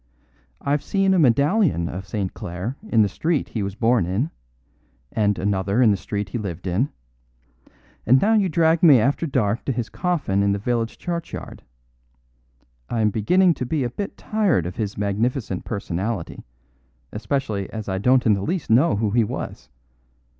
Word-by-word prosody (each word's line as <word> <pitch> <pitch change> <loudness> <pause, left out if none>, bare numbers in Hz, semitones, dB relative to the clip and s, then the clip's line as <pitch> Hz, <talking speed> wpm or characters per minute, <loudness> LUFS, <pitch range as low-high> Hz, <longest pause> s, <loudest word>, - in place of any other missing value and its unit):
I've 140 +1 0
seen 195 -1 +1
a 185 - +3
medallion 140 - +3
of 95 +3 -6
St. 100 -3 -3
Clare 90 +9 -5
in 110 -2 +4
the - - +2
street 155 - -1
he 110 - -3
was 100 0 -3
born 115 -5 +2
in, 110 - -1 0.8
and 105 -2 +1
another 100 +2 0
in 120 -4 +6
the - - +2
street 100 +1 -4
he 120 - -3
lived 90 -4 -6
in; 100 +10 0 1.2
and 130 +4 +6
now 220 +8 +3
you 205 -4 +3
drag 160 0 +3
me 150 -8 +7
after 140 +8 +1
dark 115 -5 0
to - - 0
his 120 -2 -3
coffin 160 - -1
in 100 0 +2
the - - 0
village 115 +1 -2
churchyard. 170 -1 -6 1.3
I 115 - -1
am 105 -1 +3
beginning 175 - +3
to 125 - -4
be 150 0 0
a 120 - -2
bit 200 +9 -5
tired 205 - +1
of 90 +1 -6
his 105 -3 -3
magnificent 105 0 -1
personality, 100 -1 -4 0.7
especially 105 -2 -2
as 110 -2 -6
I 95 -1 -2
don't 125 +4 +3
in 110 - +5
the 100 - -1
least 165 - -2
know 135 +7 +4
who 105 0 0
he 115 +1 +3
was. 85 - -6
115 Hz, 175 wpm, -22 LUFS, 100-145 Hz, 1.3 s, me